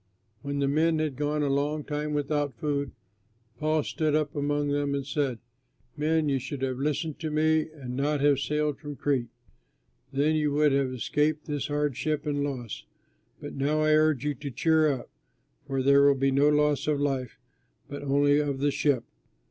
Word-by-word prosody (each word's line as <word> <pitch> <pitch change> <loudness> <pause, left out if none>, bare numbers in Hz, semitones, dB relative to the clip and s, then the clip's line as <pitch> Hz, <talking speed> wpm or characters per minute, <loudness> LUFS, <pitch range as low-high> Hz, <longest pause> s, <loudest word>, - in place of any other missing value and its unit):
When 140 0 -4
the 140 0 +1
men 160 +3 +2
had 155 -3 -1
gone 150 +2 -1
a - - +1
long 145 +2 0
time 150 0 -3
without 145 -2 -1
food, 140 -2 -2 0.7
Paul 155 0 +1
stood 155 0 0
up 150 -2 -1
among 145 0 0
them 145 0 0
and 140 -1 -3
said, 140 -3 -1 0.6
"Men, 155 +1 +1
you 135 -2 +1
should 135 +1 -6
have 130 -1 -2
listened 150 +2 -2
to 160 - -3
me 155 +1 +2
and 130 -5 -7
not 145 +2 0
have 140 -1 +3
sailed 150 0 -1
from 145 -1 -7
Crete, 130 -3 -1 0.8
then 145 +3 +2
you 150 -2 +1
would 150 0 +3
have 135 -1 +1
escaped 150 +5 0
this 145 -3 -3
hardship 150 +1 -1
and 145 -1 -1
loss. 125 -6 -5 0.6
But - - -7
now 145 +3 0
I 155 0 +3
urge 155 -3 +3
you 150 - +1
to 140 +2 -7
cheer 155 +4 +3
up, 130 - -6 0.6
for 135 -1 -1
there 140 +1 +6
will 140 - +5
be 135 0 +1
no 140 +2 +4
loss 150 -1 +2
of 150 -2 +1
life, 135 -3 -2 0.5
but 140 0 -7
only 145 +1 +3
of 145 -2 -1
the 145 +1 +1
ship. 140 -4 +1
145 Hz, 185 wpm, -27 LUFS, 140-150 Hz, 0.8 s, there